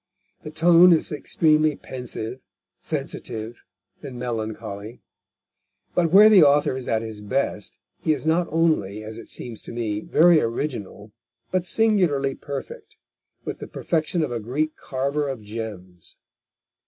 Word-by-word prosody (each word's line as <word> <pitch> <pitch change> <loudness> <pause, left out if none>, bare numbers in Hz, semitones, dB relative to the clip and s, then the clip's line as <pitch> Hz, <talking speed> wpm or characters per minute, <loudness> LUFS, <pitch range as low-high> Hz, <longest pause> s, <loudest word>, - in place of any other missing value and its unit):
The - - -8
tone 170 +3 +6
is 160 - 0
extremely 155 +1 +2
pensive, 125 -2 -6 0.4
sensitive, 115 0 -5 0.4
and 135 -4 -8
melancholy. 110 -2 -5 0.9
But 170 -2 +2
where 205 +4 +9
the 210 -4 +7
author 145 -2 +4
is 130 -1 -6
at 110 0 0
his 110 -2 -7
best, 105 -1 -2 0.2
he 160 - 0
is 155 - -1
not 170 +2 +2
only, 145 -11 0
as 110 +1 -7
it 115 - -11
seems 115 -3 -6
to - - -10
me, 110 -3 -2
very 165 +7 +4
original, 115 -4 -4 0.4
but 185 -1 0
singularly 175 -10 +2
perfect, 140 0 -8 0.5
with - - -5
the - - -7
perfection 165 +1 -1
of 150 - -3
a 120 - -2
Greek 145 +8 -2
carver 140 +2 -2
of 130 -5 -6
gems. 105 -5 -8
130 Hz, 140 wpm, -23 LUFS, 110-155 Hz, 0.9 s, where